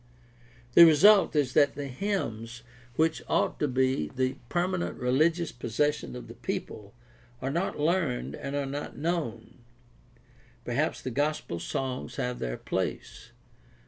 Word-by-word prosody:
The 170 Hz, -, +10 dB
result 175 Hz, +3 st, +6 dB
is 140 Hz, -4 st, +1 dB
that 145 Hz, -2 st, +4 dB
the 145 Hz, -, -4 dB
hymns 125 Hz, -, -3 dB, 0.3 s
which 160 Hz, +2 st, +1 dB
ought -, -, +1 dB
to 150 Hz, -, +1 dB
be 130 Hz, -, +1 dB
the 130 Hz, +5 st, -1 dB
permanent 180 Hz, +1 st, -1 dB
religious 155 Hz, +6 st, +2 dB
possession 125 Hz, +5 st, -1 dB
of 125 Hz, -, -8 dB
the -, -, -9 dB
people 105 Hz, +1 st, -6 dB, 0.4 s
are 135 Hz, -, -2 dB
not 170 Hz, +3 st, -2 dB
learned 155 Hz, -5 st, 0 dB
and 140 Hz, -, -5 dB
are 140 Hz, -1 st, -1 dB
not 140 Hz, +2 st, -5 dB
known. 140 Hz, -9 st, -3 dB, 1.1 s
Perhaps -, -, -1 dB
the 130 Hz, -, -3 dB
gospel 145 Hz, -, -1 dB
songs 130 Hz, +1 st, -4 dB
have 125 Hz, 0 st, -3 dB
their -, -, -3 dB
place. -, -, -4 dB
140 Hz, 135 wpm, -28 LUFS, 125-160 Hz, 1.1 s, The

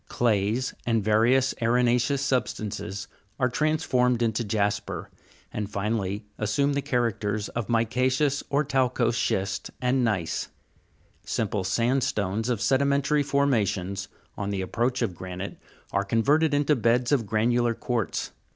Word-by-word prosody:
Clays, 115 Hz, +1 st, +1 dB
and 115 Hz, -3 st, +1 dB
various 120 Hz, +5 st, +3 dB
arena'ceous 125 Hz, +3 st, +2 dB
sub 135 Hz, -2 st, +1 dB
stances 100 Hz, -1 st, -5 dB, 0.3 s
are 125 Hz, -1 st, +2 dB
transformed 125 Hz, -4 st, +1 dB
into 115 Hz, 0 st, 0 dB
jasper, 105 Hz, -1 st, -2 dB, 0.4 s
and 105 Hz, -2 st, -3 dB
finally 105 Hz, 0 st, -2 dB
assume 140 Hz, +7 st, +1 dB
the 140 Hz, -, 0 dB
characters 110 Hz, -5 st, -1 dB
of 115 Hz, -3 st, -4 dB
mica'ceous 130 Hz, +5 st, +1 dB
or 145 Hz, +2 st, +2 dB
talcose 125 Hz, -3 st, +1 dB
schist, 95 Hz, -4 st, -1 dB
and 125 Hz, +1 st, +1 dB
gneiss. 95 Hz, -8 st, -1 dB, 0.8 s
Simple 105 Hz, -3 st, -1 dB
sandstones 110 Hz, 0 st, 0 dB
of 120 Hz, -4 st, 0 dB
sedimentary 140 Hz, +2 st, +2 dB
formations, 105 Hz, -9 st, 0 dB, 0.3 s
on 100 Hz, 0 st, -3 dB
the 100 Hz, -2 st, -2 dB
approach 120 Hz, +6 st, 0 dB
of 100 Hz, -6 st, -1 dB
granite, 95 Hz, +2 st, -7 dB, 0.3 s
are 100 Hz, -, +1 dB
converted 140 Hz, +10 st, +2 dB
into 145 Hz, +1 st, +3 dB
beds 120 Hz, +1 st, +2 dB
of 125 Hz, -7 st, +2 dB
granular 115 Hz, +2 st, +2 dB
quartz. 120 Hz, -3 st, -2 dB
115 Hz, 125 wpm, -26 LUFS, 105-130 Hz, 0.8 s, various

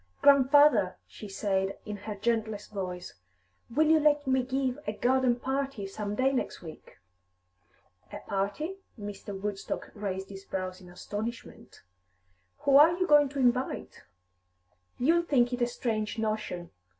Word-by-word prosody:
"Grandfather," 275 Hz, -8 st, +6 dB
she 210 Hz, -, -10 dB
said, 195 Hz, -1 st, -1 dB
in 210 Hz, -, -5 dB
her 205 Hz, +1 st, -6 dB
gentlest 220 Hz, -1 st, -2 dB
voice, 180 Hz, -3 st, -5 dB, 0.6 s
"will 295 Hz, +7 st, +2 dB
you 315 Hz, +1 st, +5 dB
let 295 Hz, -1 st, +3 dB
me 260 Hz, 0 st, +2 dB
give 260 Hz, 0 st, -1 dB
a 210 Hz, -, -1 dB
garden 250 Hz, +2 st, +2 dB
party 265 Hz, -4 st, -2 dB
some 205 Hz, +1 st, -4 dB
day 260 Hz, +4 st, +2 dB
next 255 Hz, -, -3 dB
week?" 160 Hz, -2 st, -12 dB, 1.1 s
"A -, -, -6 dB
party?" 205 Hz, -, -3 dB, 0.2 s
Mr. 205 Hz, -1 st, -7 dB
Woodstock 200 Hz, -1 st, -4 dB
raised 195 Hz, -2 st, -4 dB
his 195 Hz, -1 st, -9 dB
brows 185 Hz, -1 st, -5 dB
in 180 Hz, -, -13 dB
astonishment. 210 Hz, +6 st, -7 dB, 0.8 s
"Who 275 Hz, -1 st, +5 dB
are 325 Hz, +4 st, +7 dB
you 365 Hz, -, +1 dB
going 295 Hz, -3 st, +5 dB
to 280 Hz, 0 st, -5 dB
invite?" 250 Hz, 0 st, 0 dB, 1.0 s
"You'll 330 Hz, +7 st, +3 dB
think 255 Hz, -7 st, +2 dB
it 245 Hz, -, -3 dB
a 240 Hz, -, +3 dB
strange 225 Hz, -3 st, -2 dB
notion. 215 Hz, -5 st, -3 dB
230 Hz, 140 wpm, -29 LUFS, 200-270 Hz, 1.1 s, are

